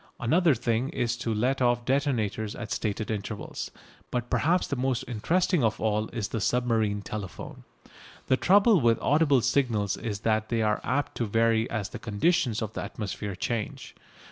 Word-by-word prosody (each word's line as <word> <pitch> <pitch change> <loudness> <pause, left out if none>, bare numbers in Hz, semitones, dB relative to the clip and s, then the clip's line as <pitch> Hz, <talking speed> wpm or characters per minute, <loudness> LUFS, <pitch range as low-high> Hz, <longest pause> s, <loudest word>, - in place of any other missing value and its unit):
Another 160 +5 +3
thing 120 +2 0
is 120 -7 -1
to 120 -1 -2
let 125 +5 0
off 120 -1 +2
detonators 115 -6 0
at 120 -4 -7
stated 105 +1 -2
intervals. 105 0 -5 0.4
But 120 -1 -3
perhaps 175 +4 +2
the 140 - -3
most 130 -1 0
interesting 165 - +1
of 110 -1 +1
all 110 0 0
is 110 -4 -4
the 115 - -3
submarine 110 -3 +1
telephone. 100 -5 -7 0.6
The 130 - +3
trouble 200 - +5
with 115 -2 +4
audible 145 -3 +3
signals 115 -6 +1
is 105 -3 -4
that 110 -1 0
they 115 -2 +1
are 105 0 +1
apt 140 +4 -1
to 115 - -1
vary 115 +1 +2
as 110 -5 -3
the - - -7
conditions 115 +2 +1
of 110 0 -5
the - - -4
atmosphere 105 -1 -5
change. 110 +3 -4
115 Hz, 170 wpm, -27 LUFS, 110-130 Hz, 0.6 s, trouble